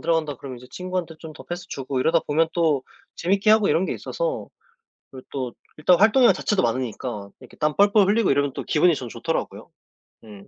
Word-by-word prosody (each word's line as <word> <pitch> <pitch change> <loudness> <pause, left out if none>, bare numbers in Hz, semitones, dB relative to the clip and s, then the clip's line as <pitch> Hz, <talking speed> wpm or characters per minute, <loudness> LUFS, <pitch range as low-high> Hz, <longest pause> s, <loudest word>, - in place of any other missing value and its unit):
들어간다 160 -4 0
그러면 130 -1 -9
이제 125 - -14
친구한테 180 -3 -4
좀 160 -1 -10
더 - - -12
패스 175 +1 -6
주고 135 -1 -4
이러다 165 +4 +3
보면 160 +2 +1
또 155 -6 +1 0.3
재밌게 195 +4 +2
하고 215 -2 +5
이런 180 - +2
게 - - -2
있어서 - - -4 0.6
그리고 130 -1 -12
또 130 -4 -4 0.2
일단 170 +3 +4
활동량 230 +4 +6
자체도 205 - 0
많으니까 115 -3 -3
이렇게 - - -16
땀 150 0 0
뻘뻘 200 0 +4
흘리고 210 -3 +3
이러면 140 -1 +1
또 - - -5
기분이 165 +1 +3
전 125 -3 -6
좋더라고요. - - -4 0.5
음. 105 -3 -13
160 Hz, 430 characters per minute, -23 LUFS, 130-185 Hz, 0.6 s, 활동량